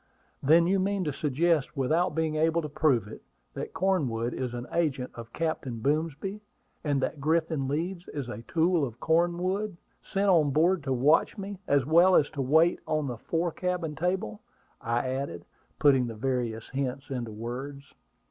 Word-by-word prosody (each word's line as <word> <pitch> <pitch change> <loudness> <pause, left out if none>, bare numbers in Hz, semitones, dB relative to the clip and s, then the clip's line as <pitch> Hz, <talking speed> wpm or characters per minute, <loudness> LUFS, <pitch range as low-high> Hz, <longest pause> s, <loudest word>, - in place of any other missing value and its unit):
"Then 165 +5 +5
you 190 +2 +2
mean 195 0 0
to 150 -4 -2
suggest 150 +1 0
without 155 +5 +1
being 160 -1 0
able 160 +2 +2
to - - -3
prove 140 -8 +1
it 110 - -10 0.3
that - - -5
Cornwood 145 -11 0
is 125 -2 -3
an 120 0 -5
agent 145 -7 0
of 115 -1 -10
Captain 160 -7 -3
Boomsby; 155 - -1 0.4
and 145 -2 +1
that 145 - -3
Griffin 160 -2 +1
Leeds 170 +5 -3
is 140 -4 -4
a 115 -2 -6
tool 170 -1 +2
of 120 -3 -4
Cornwood, 175 +4 0 0.2
sent 200 +1 -1
on 165 -6 +4
board 165 +5 +3
to 135 - -1
watch 140 +5 +3
me, 200 -1 -6
as 140 -3 +3
well 170 +5 +5
as 145 - +3
to 145 -3 -3
wait 160 +6 +4
on 155 -1 0
the 125 -3 -4
fore 165 +5 -1
cabin 180 -3 -2
table," 175 - -2 0.4
I 120 +2 -1
added, 130 -10 -4 0.3
putting 135 -4 +4
the 115 - -6
various 120 -2 -2
hints 135 +1 -3
into 120 -3 -3
words. 130 +6 -7
150 Hz, 170 wpm, -28 LUFS, 130-170 Hz, 0.4 s, Then